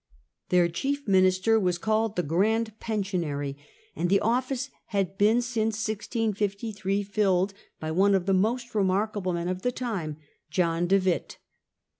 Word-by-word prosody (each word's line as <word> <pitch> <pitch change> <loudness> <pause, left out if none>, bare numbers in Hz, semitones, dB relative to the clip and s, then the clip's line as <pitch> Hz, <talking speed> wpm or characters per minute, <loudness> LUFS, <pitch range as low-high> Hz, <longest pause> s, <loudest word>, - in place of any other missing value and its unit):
Their 180 -1 +5
of 170 - +1
Orange, 165 - -13
chief 285 0 -2
minister 185 +3 +4
was 180 -3 +1
called 220 +3 0
'The 180 - 0
Grand 215 +7 0
Pen 215 -3 -1
sionary,* 145 -8 -3 0.4
and 175 - -1
the 200 +1 +4
office 255 +4 -1 0.2
had 195 -2 -1
been 220 +4 +3
since 225 -3 -1
1653 205 -2 -2
filled 195 -2 +1 0.3
by 155 0 -3
one 195 +4 +4
of 185 -2 0
the 195 - +2
most 235 +6 0
remarkable 200 -1 0
men 170 0 -2
of 185 0 -2
the 250 - 0
time, 195 - -4 0.3
John 170 +1 +1
de 195 +2 +5
Witt. 185 -2 -1
200 Hz, 160 wpm, -27 LUFS, 180-220 Hz, 0.4 s, Their